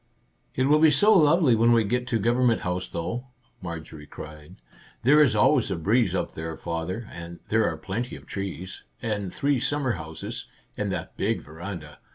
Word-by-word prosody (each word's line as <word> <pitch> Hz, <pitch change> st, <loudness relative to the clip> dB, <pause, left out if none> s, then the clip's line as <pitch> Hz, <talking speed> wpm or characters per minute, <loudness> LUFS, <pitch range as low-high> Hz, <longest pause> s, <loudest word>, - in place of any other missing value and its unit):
"It 130 Hz, -, +1 dB
will 150 Hz, +3 st, +4 dB
be 160 Hz, 0 st, +7 dB
so 205 Hz, +10 st, +5 dB
lovely 155 Hz, -4 st, +5 dB
when 115 Hz, +1 st, +4 dB
we 115 Hz, -1 st, +4 dB
get 125 Hz, +4 st, -1 dB
to 115 Hz, -3 st, 0 dB
Gov 120 Hz, +3 st, +2 dB
ernment 125 Hz, -3 st, +3 dB
House, 90 Hz, +1 st, -2 dB
though," 115 Hz, +10 st, -4 dB, 0.3 s
Marjorie 80 Hz, -4 st, -7 dB
cried. 75 Hz, 0 st, -10 dB, 0.3 s
" -, -, -27 dB
There 145 Hz, +5 st, +6 dB
is 130 Hz, -7 st, +4 dB
always 115 Hz, +4 st, +4 dB
a 95 Hz, -, -1 dB
breeze 110 Hz, +9 st, +2 dB
up -, -, -2 dB
there, 80 Hz, 0 st, -5 dB
father, 85 Hz, +7 st, -4 dB
and 85 Hz, 0 st, -9 dB
there 110 Hz, 0 st, +3 dB
are 80 Hz, -, -5 dB
plenty 100 Hz, +10 st, -4 dB
of -, -, -12 dB
trees, 95 Hz, -2 st, -6 dB, 0.2 s
and 105 Hz, -4 st, -2 dB
three 140 Hz, -2 st, +1 dB
summer 140 Hz, 0 st, 0 dB
houses, 80 Hz, -5 st, -5 dB, 0.3 s
and 105 Hz, -2 st, -2 dB
that 90 Hz, -1 st, -5 dB
big 110 Hz, +3 st, 0 dB
veranda. 80 Hz, -1 st, -8 dB
105 Hz, 190 wpm, -26 LUFS, 85-125 Hz, 0.3 s, be